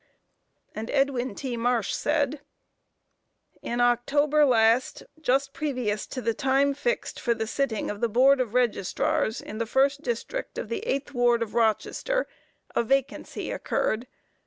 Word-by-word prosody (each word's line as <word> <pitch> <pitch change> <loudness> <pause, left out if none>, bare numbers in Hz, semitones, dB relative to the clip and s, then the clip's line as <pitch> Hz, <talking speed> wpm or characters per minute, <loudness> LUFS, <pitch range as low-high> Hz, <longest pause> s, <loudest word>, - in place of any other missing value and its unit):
And 220 +2 -5
Edwin 265 -5 0
T. 255 0 -4
Marsh 235 -2 0
said: 290 -1 0 1.2
"In 240 - -3
October 285 +5 +3
last, 230 0 +3 0.2
just 275 0 +1
previous 250 -8 -2
to 255 - -6
the 230 - +1
time 275 +2 +2
fixed 485 - -2
for 235 -2 +1
the 225 - -2
sitting 235 -3 -1
of 205 - -8
the 235 - +2
Board 260 +4 +5
of 240 -2 -3
Registrars 220 -1 +1
in 215 - -8
the 230 - -1
first 275 +4 +2
district 250 - -4
of - - -4
the 460 - -2
eighth 280 - -2
ward 240 -2 +3
of 220 - -8
Rochester, 235 - +1 0.5
a - - +3
vacancy 270 +3 -1
occurred. 230 +4 -1
250 Hz, 145 wpm, -26 LUFS, 230-275 Hz, 1.2 s, Board